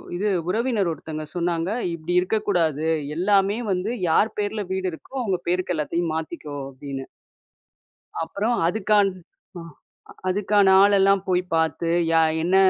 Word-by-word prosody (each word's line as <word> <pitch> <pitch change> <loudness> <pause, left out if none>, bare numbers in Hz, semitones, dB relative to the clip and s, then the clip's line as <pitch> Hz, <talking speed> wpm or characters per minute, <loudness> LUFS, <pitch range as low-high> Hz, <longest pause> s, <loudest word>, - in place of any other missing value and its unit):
இது 205 +3 0 0.2
உறவினர் 220 -3 0
ஒருத்தங்க 155 -1 -6
சொன்னாங்க, 170 0 -1 0.2
இப்டி 170 +2 -4
இருக்கக்கூடாது 175 -7 0 0.3
எல்லாமே 200 +3 +2
வந்து, 185 +5 -1 0.2
யார் 215 +6 +3
பேர்ல 205 0 -2
வீடு 190 -1 -1
இருக்கோ, 265 - -12
அவங்க 190 -5 -1
பேருக்கு 180 0 0
எல்லாத்தையும் 165 +2 -1
மாத்திக்கோ 155 -2 -5
அப்படின்னு. 135 0 -7 1.2
அப்புறம் 205 +8 -1
அதுக்கான் 205 0 +3 0.5
அ - - -7 0.7
அதுக்கான 205 +1 +2 0.2
ஆளெல்லாம் 195 -1 +4
போய் 180 -1 +2
பாத்து, 160 +1 0 0.2
யா 165 0 +5 0.2
என்ன 180 +2 +2
180 Hz, 125 wpm, -23 LUFS, 165-205 Hz, 1.2 s, யா